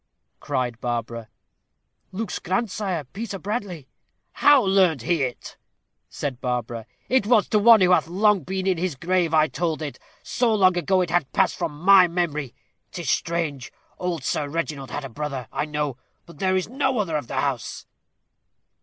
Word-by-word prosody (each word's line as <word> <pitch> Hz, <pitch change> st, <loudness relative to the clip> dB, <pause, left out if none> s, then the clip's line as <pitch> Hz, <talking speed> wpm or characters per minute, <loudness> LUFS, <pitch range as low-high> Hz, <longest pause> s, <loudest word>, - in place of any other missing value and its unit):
cried 125 Hz, -2 st, -3 dB
Barbara. 115 Hz, -1 st, -4 dB, 0.8 s
"Luke's 210 Hz, +4 st, -4 dB
grandsire, 190 Hz, -3 st, -2 dB
Peter 215 Hz, -1 st, -5 dB
Bradley." 195 Hz, -, -5 dB, 0.4 s
"How 290 Hz, -3 st, +5 dB
learnt 190 Hz, -, +3 dB
he 170 Hz, +2 st, +1 dB
it?" 125 Hz, -2 st, -4 dB, 0.5 s
said 135 Hz, -4 st, -5 dB
Barbara. 120 Hz, -2 st, -3 dB, 0.2 s
"It 255 Hz, -5 st, +2 dB
was 225 Hz, -3 st, +4 dB
to 210 Hz, -, +3 dB
one 225 Hz, 0 st, +7 dB
who 180 Hz, 0 st, +4 dB
hath 180 Hz, -, +3 dB
long 205 Hz, +3 st, +3 dB
been 190 Hz, +5 st, -4 dB
in 185 Hz, -3 st, +1 dB
his 180 Hz, -4 st, -2 dB
grave 175 Hz, +3 st, 0 dB
I 155 Hz, -1 st, +5 dB
told 165 Hz, -1 st, -2 dB
it; 145 Hz, -, -6 dB, 0.2 s
so 235 Hz, -3 st, +1 dB
long 185 Hz, -3 st, +4 dB
ago, 185 Hz, +2 st, +2 dB
it 175 Hz, -2 st, -2 dB
had 175 Hz, -5 st, 0 dB
passed -, -, +2 dB
from 150 Hz, -2 st, -4 dB
my 190 Hz, +1 st, +7 dB
memory. 155 Hz, -7 st, -2 dB, 0.4 s
'Tis 170 Hz, -7 st, -2 dB
strange! 160 Hz, -6 st, -2 dB, 0.3 s
old 175 Hz, -5 st, -3 dB
Sir 145 Hz, -, -1 dB
Reginald 150 Hz, -4 st, -4 dB
had 145 Hz, +3 st, -5 dB
a -, -, -4 dB
brother, 135 Hz, -1 st, -5 dB
I -, -, -2 dB
know. 150 Hz, -3 st, -3 dB, 0.3 s
But 170 Hz, -, -15 dB
there 190 Hz, -1 st, +1 dB
is 185 Hz, -, 0 dB
no 265 Hz, +1 st, -1 dB
other 185 Hz, -7 st, -1 dB
of 145 Hz, -5 st, -2 dB
the -, -, -6 dB
house." -, -, -3 dB
170 Hz, 170 wpm, -24 LUFS, 145-195 Hz, 0.8 s, one